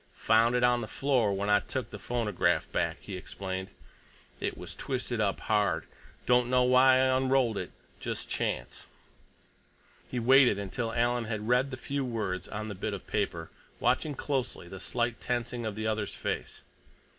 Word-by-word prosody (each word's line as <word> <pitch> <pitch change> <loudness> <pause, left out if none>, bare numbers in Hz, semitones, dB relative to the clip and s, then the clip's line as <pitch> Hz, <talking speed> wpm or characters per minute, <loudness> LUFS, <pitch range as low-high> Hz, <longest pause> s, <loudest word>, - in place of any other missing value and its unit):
"Found 115 +2 +3
it 125 - +2
on 125 0 +4
the 110 - -4
floor 125 -3 +1
when 100 +1 -1
I 105 0 +5
took - - -5
the - - -7
phonograph 115 -6 0
back," - - 0
he 100 - -7
explained. 95 +1 -5 0.7
"It - - -2
was - - -8
twisted 125 -3 -2
up 100 -2 0
hard. 100 -7 +1 0.4
Don't 125 0 +4
know 125 0 +4
why 130 +1 +6
I 130 0 +4
unrolled 130 -3 +2
it. - - -4 0.3
Just - - -3
chance." - - -3 1.2
He 125 - -4
waited 125 -2 +6
until 100 +4 -3
Alan 120 0 +1
had 110 -1 -4
read 125 +3 +3
the 130 - -6
few 140 +2 -2
words 110 -7 -3
on 105 +1 -4
the 105 - -4
bit 100 +2 -3
of 95 - -10
paper, 85 -6 -2 0.3
watching 150 -2 +1
closely 130 -10 -2
the 95 +2 -8
slight 120 +3 -2
tensing 120 -1 -2
of 105 - -4
the 110 +1 -3
other's 110 -2 -1
face. - - -4
115 Hz, 170 wpm, -30 LUFS, 105-125 Hz, 1.2 s, why